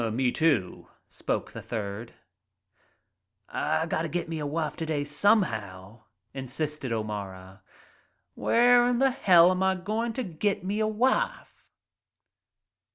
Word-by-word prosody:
et 115 - 0
Me, 125 +2 +1
too," 140 - 0 0.2
spoke - - -3
the - - -8
third. 110 +1 -6 1.3
"I - - -1
gotta - - -2
get 175 -1 -3
me 165 -1 -4
a 150 - -3
wife 155 0 -2
t'day, 155 -3 -2
somehow," 115 - 0 0.3
insisted 135 +1 -4
O'Mara. 100 -3 -5 0.7
"Where 245 +1 +4
in 245 -1 +1
hell 190 -10 +5
'm 185 0 -1
I 190 0 +2
goin' 215 +5 -2
t' 255 - -3
get 190 +1 -2
me 200 +3 -2
a 215 - +2
wife?" 255 - -1
155 Hz, 125 wpm, -27 LUFS, -, 1.3 s, hell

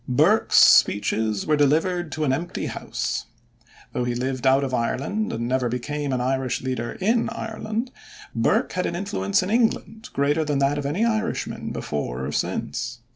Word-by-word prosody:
Burke's 125 - +3
speeches 105 +1 +4
were 155 - +3
delivered 160 +4 +1
to 155 - -2
an 135 -3 +2
empty 170 +6 -3
house. - - -3 0.7
Though 125 - -1
he 120 0 -1
lived 130 +1 -1
out 135 +1 +4
of 130 -2 -3
Ireland 135 - -1
and 115 +1 -3
never 125 -1 +1
became 145 +4 -3
an 130 - 0
Irish 130 0 0
leader 125 -3 -3
in 225 +5 +2
Ireland, 225 +2 -4 0.4
Burke - - +1
had 180 - 0
an 170 - -3
influence 100 - 0
in 185 - -3
England 225 0 0
greater 145 +3 +1
than 145 -2 -1
that 140 +1 +2
of 140 - -2
any 180 +11 +1
Irishman 225 0 -2
before 65 -3 -3
or 70 - -3
since. 115 - -3
140 Hz, 170 wpm, -24 LUFS, 125-180 Hz, 0.7 s, speeches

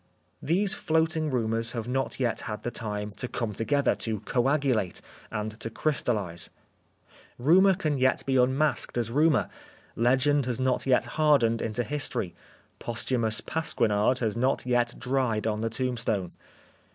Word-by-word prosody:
These 190 +6 +1
floating 160 -1 0
rumours 115 -2 -1
have 115 -2 -4
not 135 +2 -2
yet 120 -3 0
had 105 - -5
the 120 - -3
time 105 -2 -4
to 125 - -3
come 115 -3 -3
together, 140 +6 +1
to 110 -2 -2
coagulate, 125 - 0 0.3
and 105 +1 -3
to 115 - -4
Preface - - -18
crystallise. 105 - -1 0.9
Rumour 185 +9 +5
can 155 -6 -1
yet 130 0 +2
be 135 - 0
unmasked 130 +2 +1
as 115 -1 -1
rumour^ 150 +1 +3 0.5
legend 130 +3 +2
has 125 -1 -2
not 130 0 0
yet 130 -2 +4
hardened 125 -4 +2
into 115 +2 -1
history, 130 -9 -1 0.5
posthumous 115 -2 0
pasquinade 125 -6 +1
has 110 -3 0
not 130 +3 0
yet 120 -1 +1
dried 125 -4 0
on 110 -1 -1
the 115 - 0
tombstone. 115 -6 -2
125 Hz, 145 wpm, -27 LUFS, 115-140 Hz, 0.9 s, Rumour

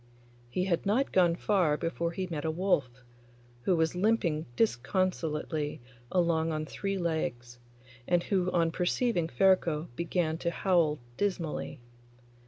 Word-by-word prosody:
He 180 +9 -1
had 175 -3 0
not 225 +7 +1
gone 175 -3 +4
far 175 -6 +2
before 170 +1 -2
he 185 +2 -3
met 160 -5 -4
a 160 - 0
wolf, 160 -5 +1 0.7
who 180 +8 +2
was 160 -1 +1
limping 180 -5 +1
disconsolately 150 - 0 0.3
along 165 -2 +2
on 155 0 -2
three 195 +5 -3
legs, 120 -9 -3 0.5
and 175 -1 +2
who 185 -3 +1
on 170 -2 +2
perceiving 180 +1 0
Ferko 170 +1 +2
began 170 0 -1
to 170 - 0
howl 170 -4 +2 0.2
dismally. 180 -10 -2
170 Hz, 130 wpm, -30 LUFS, 155-185 Hz, 0.7 s, gone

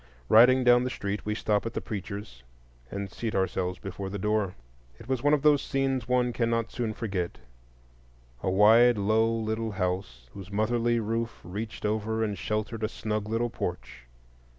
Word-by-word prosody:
Riding 125 +4 +7
down 125 0 +6
the 125 - -1
street, 105 -3 -4
we 105 - 0
stop 105 -2 0
at - - -7
the - - 0
preacher's 100 - -6 0.5
and 100 +2 -5
seat 115 -2 -4
ourselves 95 -1 -1
before 95 +1 -6
the 100 - -4
door. 105 -1 0 0.4
It - - -13
was 130 -2 -1
one 145 +1 +4
of 145 - -4
those 150 -2 +5
scenes 135 -3 -1
one 125 -1 +2
cannot 115 -1 0
soon 115 -3 -3
forget:—a - - -7
wide, 110 +5 +6
low, 110 +3 +2
little 110 -1 -2
house, 90 - -3
whose 100 0 -10
motherly 115 +3 +1
roof 115 +1 -2
reached 105 +6 -6
over 110 +1 0
and 105 -2 -1
sheltered 110 +3 -3
a 110 - +1
snug 105 -2 -3
little 115 +1 0
porch. 65 - -6
110 Hz, 165 wpm, -28 LUFS, 95-115 Hz, 0.5 s, Riding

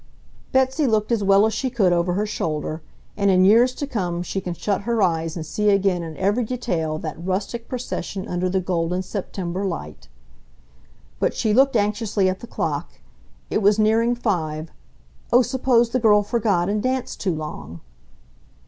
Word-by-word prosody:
Betsy 265 +3 +2
looked 215 -1 +1
as 225 -3 +1
well 195 +1 +5
as 220 - 0
she 260 +5 -1
could 205 -8 +2
over 175 +1 +1
her 205 +3 0
shoulder... 155 -5 -3 0.3
and 200 -1 +1
in 185 -1 +5
years 235 +5 +5
to 285 - -3
come 180 -10 -2
she 195 +2 -3
can 175 -2 -4
shut 200 +3 -1
her 230 0 0
eyes 165 -2 0
and 165 -2 -5
see 210 +7 0
again 195 -3 +2
in 160 -2 -7
every 205 +6 +1
detail 180 -10 -2
that 155 +1 -6
rustic 200 +6 -3
procession 235 -6 -4
under 180 +1 -1
the 190 +1 +1
golden, 180 0 -1
September 185 -1 -4
light. 75 - -5 1.1
But - - 0
she 215 - +1
looked 270 +2 +4
anxiously 210 -2 +1
at 185 0 -1
the 235 - -10
clock. - - -3 0.6
It - - +1
was 205 +1 +4
nearing 225 +2 +3
five. 160 -9 -2 0.6
Oh, 245 +1 +6
suppose 245 -2 +2
the 255 - +1
girl 210 -3 +4
forgot 205 -5 +1
and 205 +1 0
danced 255 +2 -2
too 185 -5 0
long! 85 - -7
200 Hz, 175 wpm, -22 LUFS, 175-230 Hz, 1.1 s, Oh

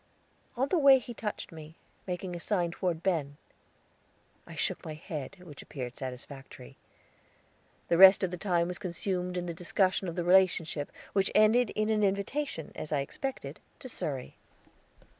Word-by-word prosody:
On 265 +3 +1
the 355 - +2
way 275 -2 +8
he 245 -1 -7
touched 215 -2 -5
me, 160 -1 -11 0.3
making 180 0 -4
a - - -5
sign 175 -2 0
toward 170 -2 -2
Ben. 150 -6 -1 1.1
I - - -10
shook - - -1
my 155 - -6
head, 155 0 -7
which 150 -5 -11
appeared 125 -3 -7
satisfactory. 130 - -9 1.1
The 170 - +2
rest 190 +1 +9
of 185 - 0
the 180 - -4
time 175 -3 +1
was 180 -2 -5
consumed 180 0 -3
in 175 - -2
the 170 - -4
discussion 185 +2 0
of 170 - -4
the 175 - -1
relationship, 170 -5 +3 0.2
which 195 -1 +2
ended 220 +2 +5
in 215 0 0
an 215 -1 +2
invitation, 200 - -1
as 155 - -7
I 145 -2 +1
expected, 270 - -5 0.2
to 260 - -9
Surrey. 140 - -5
180 Hz, 160 wpm, -30 LUFS, 160-200 Hz, 1.1 s, rest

